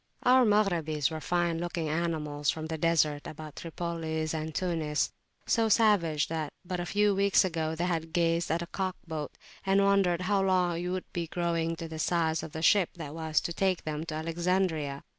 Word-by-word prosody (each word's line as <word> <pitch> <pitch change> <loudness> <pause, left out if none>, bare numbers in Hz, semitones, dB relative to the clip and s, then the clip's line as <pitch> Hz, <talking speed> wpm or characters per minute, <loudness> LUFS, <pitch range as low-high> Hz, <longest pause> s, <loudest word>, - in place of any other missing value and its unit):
Our 255 0 +6
Maghrabis 170 -9 +2
were 160 -1 -5
fine 170 -1 0
looking 170 -1 -3
animals 150 -3 -1
from 155 -1 -1
the 160 0 -4
deserts 155 -3 +2
about 155 -1 -9
Tripoli 165 -2 -3
and 160 0 -3
Tunis; 160 -5 0 0.3
so 225 -2 +2
savage 190 -9 +3
that, 160 -2 -3
but 180 0 -3
a 175 - -3
few 205 0 +3
weeks 200 0 +4
ago, 160 -3 -2
they 170 +2 -1
had 165 -2 -2
gazed 170 -1 +1
at 165 +2 0
the - - -3
cock 185 +1 -3
boat, 155 -3 -5 0.3
and 195 +1 +3
wondered 195 -3 +3
how 195 +1 +1
long 180 -3 +1
it - - -3
would 185 0 -4
be 170 -1 -2
growing 165 -1 -1
to 165 0 -6
the 160 -1 -7
size 160 -1 +1
of 160 - -7
the 160 +1 -5
ship 190 0 +5
that 155 -4 -7
was 160 -1 0
to 170 - -3
take 190 0 0
them 155 0 -3
to 155 - -4
Alexandria. 165 -3 -1
165 Hz, 195 wpm, -29 LUFS, 160-185 Hz, 0.3 s, Our